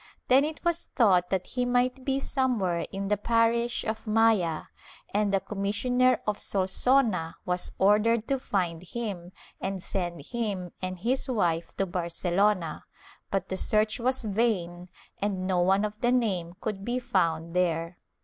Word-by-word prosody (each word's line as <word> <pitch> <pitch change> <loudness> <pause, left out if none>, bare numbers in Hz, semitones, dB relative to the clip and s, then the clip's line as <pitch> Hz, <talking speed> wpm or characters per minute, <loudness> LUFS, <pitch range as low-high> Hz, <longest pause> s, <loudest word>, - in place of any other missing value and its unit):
Then 260 +2 +6
it 310 +3 -5
was 340 0 +1
thought 185 -7 +3
that 185 -2 0
he 250 - -2
might 250 +1 +1
be 270 0 0
somewhere 235 -12 0
in 195 0 -3
the 210 - +2
parish 230 +2 +1
of 220 +1 -4
Maya, 215 -7 +3 0.5
and 205 0 +2
the 195 - +3
commissioner 230 +6 +1
of 210 -1 -2
Solsona 195 -2 +1
was 180 0 0
ordered 210 +3 +3
to 270 -1 0
find 175 -9 -1
him 185 -3 -5 0.3
and 195 0 -3
send 175 -4 -3
him 205 -7 -3
and 185 0 -3
his 250 +8 -1
wife 170 -8 0
to 195 - +1
Barcelona, 175 0 0 0.5
but 195 - -2
the 190 - -2
search 215 +3 +1
was 255 +1 0
vain 190 -5 -1 0.3
and 195 -2 -1
no 185 -1 +1
one 190 +3 +3
of 210 0 -6
the 240 - +3
name 190 -9 0
could 200 -3 -3
be 240 +4 -1
found 165 -10 0
there. 170 -1 0
205 Hz, 155 wpm, -28 LUFS, 180-235 Hz, 0.5 s, Then